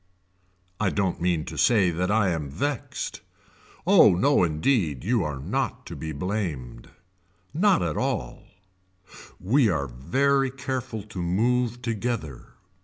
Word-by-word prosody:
I 105 - +2
don't 95 -3 -1
mean 85 -3 0
to 80 -1 -6
say 100 -7 +4
that 90 +2 -1
I 105 -2 +3
am 80 -5 -2
vexed. 135 - -4 0.6
Oh - - +6
no 140 +6 +3
indeed 80 - +1
you 115 -1 +1
are 75 -2 -3
not 65 - -3
to - - -7
be 80 - -5
blamed. 80 - -4 0.6
Not 190 +2 +3
at - - -2
all 125 -3 -3 0.9
We 115 +5 +3
are 75 -6 0
very 135 - +1
careful 130 -4 -4
to 100 -3 -7
move 120 +7 0
together. 110 - -4
100 Hz, 130 wpm, -25 LUFS, 80-125 Hz, 0.9 s, Oh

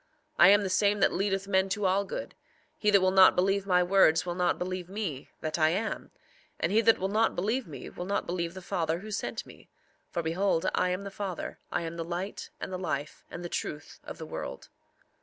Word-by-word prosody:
I - - +9
am 205 +1 +6
the 195 - -2
same 205 +2 +3
that - - +4
leadeth 195 0 -1
men 190 -1 +2
to 205 +1 -1
all 195 +2 +2
good; - - -6 0.4
he 210 - +1
that 200 -2 +5
will 185 0 +3
not 190 0 +7
believe 195 +2 +1
my 180 -1 +4
words 180 -3 +4
will 175 - -2
not 180 0 +1
believe 185 0 -4
me—that 160 -5 -4
I 155 0 +5
am; 200 +7 -2 0.5
and - - 0
he 220 +2 +4
that 225 0 +5
will 190 - -1
not 220 +3 +1
believe 220 +6 -1
me 150 - -8
will 175 - -7
not 200 - -1
believe 170 0 -3
the 190 - -8
Father 170 -3 -1
who 215 +1 -8
sent 200 - -3
me. - - -16 0.4
For 170 - -3
behold, 170 +1 +1
I 180 - +2
am 180 +2 -2
the 200 - -6
Father, 195 -3 -5
I 170 - -1
am 165 0 -5
the 165 - -2
light, 175 +4 -5
and 190 - -5
the 185 - -3
life, 150 -4 -4
and 175 - -7
the - - -2
truth 150 -3 -5
of - - -8
the - - -7
world. - - -7
185 Hz, 225 wpm, -29 LUFS, 175-200 Hz, 0.5 s, I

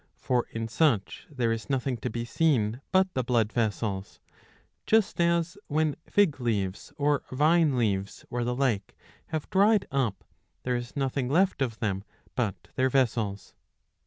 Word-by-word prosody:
For 125 -2 0
in 115 0 -4
such 115 -4 +1
there 125 -6 0
is 115 +3 -4
nothing 135 -1 0
to - - -3
be 115 +1 -3
seen 120 -3 +1
but 190 0 +3
the 130 - 0
blood 115 -3 +1
vessels; 105 -3 -2 0.7
just 220 -5 +3
as 170 +2 +1
when 155 -1 +1
fig 195 -9 +3
leaves 100 -5 -2
or 145 -1 +2
vine 150 +1 +3
leaves 100 -4 -1
or 120 0 -1
the 125 +1 -1
like 125 -7 -1 0.3
have 155 -2 -3
dried 205 +2 +4
up, 120 -9 -1 0.4
there 125 -1 0
is 120 0 -5
nothing 135 -2 -1
left 180 +1 +2
of 120 -4 -1
them 100 -3 -1 0.3
but 110 -7 -3
their 130 0 +2
vessels. 115 -6 0
125 Hz, 155 wpm, -28 LUFS, 115-150 Hz, 0.7 s, dried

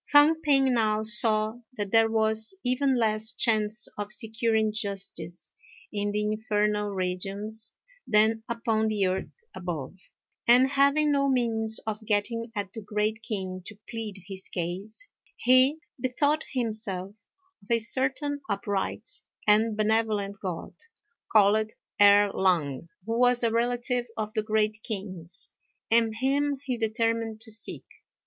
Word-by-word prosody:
Fang 300 +2 +6
p'ing 270 -4 +3
now 215 -2 +1
saw 220 0 +2 0.2
that 205 -2 -3
there 225 0 +5
was 220 +4 +1
even 260 +1 +2
less 220 0 +1
chance 220 -1 +2
of 205 0 -4
securing 220 -1 +1
justice 195 -5 -3 0.4
in 205 0 -1
the 210 +1 -1
Infernal 210 -1 0
Regions 195 +3 -2 0.3
than 220 0 +3
upon 225 -2 0
the 210 -3 +1
earth 190 - -3
above; 165 -7 -5 0.5
and, 250 +3 +6
having 280 +2 +3
no 275 -1 +2
means 225 -4 0
of 220 0 -4
getting 225 +2 -1
at 200 -2 -4
the 225 - -6
Great 210 +2 -1
King 190 -4 -4
to 210 - -9
plead 215 -5 -6
his 190 -1 -7
case, 190 - -5 0.3
he 255 +4 +4 0.2
bethought 285 +5 +1
himself 215 -5 -4 0.3
of 195 - -22
a 235 - +4
certain 265 +5 -1
upright 200 +2 -2 0.4
and 215 +1 +3
benevolent 215 -2 +1
God, 180 -4 -5 0.6
called 215 +1 +4 0.3
Erh 205 0 +7
Lang, 165 -5 0 0.2
who 230 +1 -1
was 245 -1 +4
a 230 - +3
relative 240 +1 0
of 215 -1 -3
the 215 - +1
Great 215 0 0
King's, 185 -6 -6 0.4
and 225 -1 +3
him 280 +4 +1
he 255 -2 -1
determined 225 -1 -1
to 220 0 -7
seek. 220 +1 -3
220 Hz, 135 wpm, -27 LUFS, 205-235 Hz, 0.6 s, Erh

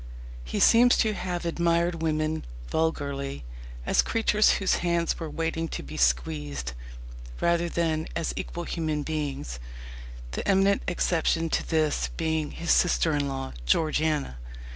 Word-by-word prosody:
He - - -3
seems 245 +1 +6
to 220 -2 +2
have 180 -3 -3
admired 170 0 +1
women 155 0 0 0.3
vulgarly 140 - -1 0.4
as - - +4
creatures 215 -2 +3
whose 195 - +1
hands 170 -1 0
were 165 -2 -4
waiting 165 +1 -2
to - - -5
be - - -9
squeezed, 65 +1 0 0.7
rather 170 0 +2
than 160 -2 0
as 165 - -1
equal 175 - -5
human 155 -3 -2
beings; 140 - -4 0.7
the - - -4
eminent 195 0 +3
exception 165 -2 +1
to - - 0
this 155 -2 +1
being 160 -2 0
his 170 - -2
sister 170 -2 +3
in 145 -1 0
law, 135 -1 -4
Georgiana. 155 - +1
160 Hz, 135 wpm, -27 LUFS, 145-170 Hz, 0.7 s, seems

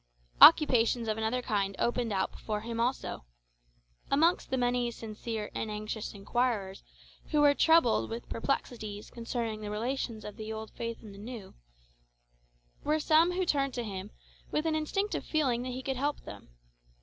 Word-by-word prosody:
Occupations 245 -7 +7
of 215 0 -1
another 230 +3 -1
kind 200 -4 -1
opened 240 -1 0
out 190 -1 0
before 210 -1 -4
him 230 +1 -5
also. 245 - -1 0.9
Amongst 325 +5 +3
the 260 - 0
many 245 -1 +1
sincere 220 -1 -5
and 220 - -3
anxious 215 0 -5
inquirers 200 -2 -1 0.5
who 300 -1 +3
were 290 -1 +6
troubled 320 -5 +4
with 230 +1 -6
perplexities 225 -4 -3
concerning 230 -2 -3
the 210 - -5
relations 230 +1 -3
of 210 - -8
the 220 -1 -6
old 220 0 -6
faith 230 0 -5
and 210 -2 -10
the 200 - -12
new, 220 -2 -8 1.3
were 305 +1 +1
some 320 +3 +4
who 370 +1 0
turned 275 -5 +1
to 240 - -2
him, 195 -4 -6 0.4
with 305 - -1
an 320 - +1
instinctive 390 +7 -1
feeling 265 -7 +1
that 255 - -4
he 255 +1 -5
could 265 -1 -2
help 285 +3 -1
them. 100 -11 -11
235 Hz, 160 wpm, -30 LUFS, 215-275 Hz, 1.3 s, Occupations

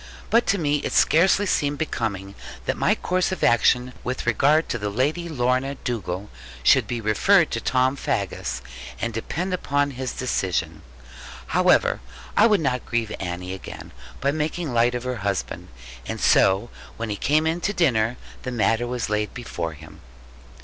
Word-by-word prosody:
But 230 +2 +4
to 200 - +3
me 150 -4 +1
it - - -4
scarcely 190 +5 +4
seemed 145 -6 0
becoming 100 -10 -3 0.3
that - - 0
my - - +2
course 185 +1 0
of 185 - -4
action 125 +2 +3
with 125 +1 -3
regard 140 +7 +3
to 120 - -2
the 105 -1 -2
Lady 150 +10 -1
Lorna 130 -1 0
Dugal 105 -7 -4 0.3
should - - +5
be 120 -1 -2
referred 160 - +3
to 115 - -2
Tom 130 +2 +2
Faggus, 95 - -3 0.4
and 115 -1 -2
depend 175 - -3
upon 145 -5 0
his 130 -1 -4
decision. 95 -8 -2 0.6
However, - - +3 0.4
I 215 - +6
would 210 -5 +3
not 130 -4 0
grieve 115 -2 -2
Annie 90 0 -4
again 95 - -9 0.3
by 140 - +2
making 155 0 -2
light 120 +1 +3
of 125 - -3
her 125 -1 -3
husband; 100 -2 -3 0.4
and - - -4
so 95 -8 +3 0.3
when 115 -1 -3
he - - -1
came 150 +9 +2
in 165 +2 0
to 200 - 0
dinner, 125 - +1 0.2
the 125 - -4
matter 115 0 +1
was 125 -2 -2
laid 105 0 -2
before 85 -10 -4
him. 75 - -14
125 Hz, 165 wpm, -24 LUFS, 110-150 Hz, 0.6 s, I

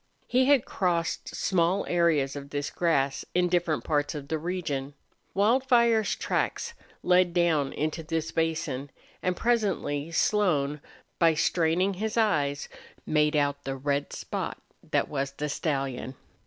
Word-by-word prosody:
He 255 +1 +3
had 275 -3 +4
crossed 170 -4 -1
small 185 +1 +1
areas 160 -6 +2
of 140 0 -7
this 145 0 -3
grass 140 -5 +1
in 180 0 +3
different 175 -3 +1
parts 145 0 0
of 140 -2 -7
the 160 - -1
region. 150 -5 -3 0.4
Wildfire's 235 0 +3
tracks 470 - -2 0.3
led 180 -1 +3
down 160 -5 +2
into 155 +2 -2
this 160 0 -3
basin, 160 -4 -1 0.3
and 180 -1 -1
presently 195 -11 0
Slone, 155 -7 +1 0.4
by 165 -2 +5
straining 170 +4 +2
his 215 +4 -3
eyes, 145 -10 +1 0.4
made 150 0 +2
out 145 -1 +1
the 135 0 -3
red 140 +1 -1
spot - - -4 0.3
that - - +1
was 140 -1 -3
the 150 +2 -3
stallion. 135 -4 -2
160 Hz, 135 wpm, -27 LUFS, 145-185 Hz, 0.4 s, by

